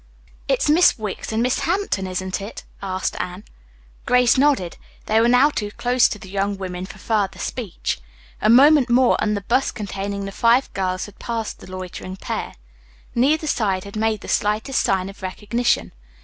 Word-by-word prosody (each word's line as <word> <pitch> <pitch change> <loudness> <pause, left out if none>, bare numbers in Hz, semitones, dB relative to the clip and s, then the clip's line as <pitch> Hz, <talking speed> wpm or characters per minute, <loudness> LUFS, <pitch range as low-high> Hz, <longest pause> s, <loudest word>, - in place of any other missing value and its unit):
"It's - - +1
Miss 325 +4 +5
Wicks 215 -2 -5
and 220 +1 +1
Miss 250 0 +1
Hampton, 345 - -1
isn't 185 +1 -3
it?" 200 +3 -8 0.2
asked 185 -1 -2
Anne. 180 +2 -5 0.6
Grace 250 -1 +5
nodded. 260 -11 +2 0.3
They 220 +1 +3
were 230 - +4
now 250 +5 +5
too 210 -7 -3
close 245 +3 +2
to - - -4
the 195 - -12
young 200 +1 -1
women 185 -1 -5
for - - -11
further 210 -4 -1
speech. 210 - -4 0.4
A - - +3
moment 270 +2 +6
more 250 +1 +4
and 210 -1 +1
the - - -4
bus 250 +7 +1
containing 200 -2 -4
the 195 - -5
five 235 +6 +2
girls 185 -1 -1
had 205 - -14
passed 230 -2 -4
the - - -13
loitering 185 0 -7
pair. - - -4 0.6
Neither 295 +6 +2
side 200 -10 0
had 200 +1 -10
made 215 -1 0
the - - -10
slightest 215 +5 0
sign 190 -1 +1
of 195 +1 -11
recognition. 210 +6 -1
210 Hz, 175 wpm, -22 LUFS, 195-245 Hz, 0.6 s, moment